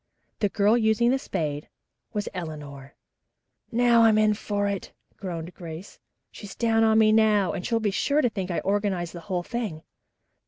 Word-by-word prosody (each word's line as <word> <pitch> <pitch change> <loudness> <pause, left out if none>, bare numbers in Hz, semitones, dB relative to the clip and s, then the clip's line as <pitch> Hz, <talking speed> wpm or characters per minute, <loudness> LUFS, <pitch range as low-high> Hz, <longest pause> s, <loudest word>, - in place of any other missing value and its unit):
The 205 - +1
girl 210 +2 +3
using 220 +2 +3
the 270 - +1
spade 150 - -4 0.4
was 210 -2 -3
Eleanor. 145 -6 -8 0.8
"Now 235 0 +4
I'm 225 -1 +5
in 215 0 +4
for 205 -1 -2
it," 200 -2 -4 0.2
groaned 175 -2 -6
Grace. 170 +1 -9 0.3
"She's 205 -3 -10
down 225 -1 +2
on 220 0 +4
me 215 -1 +5
now, 215 -3 +3
and 180 - -4
she'll 230 +2 0
be 215 -2 0
sure 285 +9 +1
to 245 - +3
think 190 -4 -4
I 175 - -1
organized 195 -4 -1
the 175 - -7
whole 180 -2 -1
thing." 210 -8 -4
205 Hz, 170 wpm, -25 LUFS, 175-220 Hz, 0.8 s, I'm